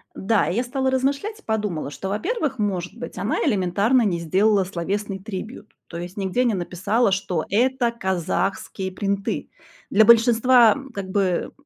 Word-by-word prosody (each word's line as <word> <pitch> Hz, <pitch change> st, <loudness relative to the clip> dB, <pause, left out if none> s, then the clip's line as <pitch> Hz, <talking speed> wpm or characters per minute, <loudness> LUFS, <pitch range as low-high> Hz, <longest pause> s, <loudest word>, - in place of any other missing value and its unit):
Да, 210 Hz, +2 st, +1 dB
и 175 Hz, -, -2 dB
я 240 Hz, -, +1 dB
стала 265 Hz, +1 st, -1 dB
размышлять, 280 Hz, +12 st, -1 dB
и -, -, -21 dB
подумала, 210 Hz, -9 st, -2 dB
что, 190 Hz, +6 st, -6 dB
во-первых, 265 Hz, -, -2 dB
может 185 Hz, -4 st, -2 dB
быть, 245 Hz, -, -8 dB
она 200 Hz, -, -1 dB
элементарно 200 Hz, +6 st, +2 dB
не 190 Hz, -6 st, 0 dB
сделала 195 Hz, +4 st, +2 dB
словесный 195 Hz, +2 st, -3 dB
трибьют, 210 Hz, +2 st, -8 dB
то 170 Hz, -, -8 dB
есть 175 Hz, +3 st, -7 dB
нигде 195 Hz, +5 st, 0 dB
не 240 Hz, -3 st, +1 dB
написала, 195 Hz, +5 st, 0 dB
что 180 Hz, -4 st, -2 dB
это 245 Hz, +3 st, +2 dB
казахские 190 Hz, -1 st, -2 dB
принты. 200 Hz, +1 st, -2 dB, 0.4 s
Для 215 Hz, +2 st, +5 dB
большинства, 235 Hz, +1 st, +6 dB
м, 275 Hz, -1 st, -9 dB
как 200 Hz, -4 st, -6 dB
бы 185 Hz, -3 st, 0 dB
205 Hz, 160 wpm, -23 LUFS, 190-240 Hz, 0.4 s, большинства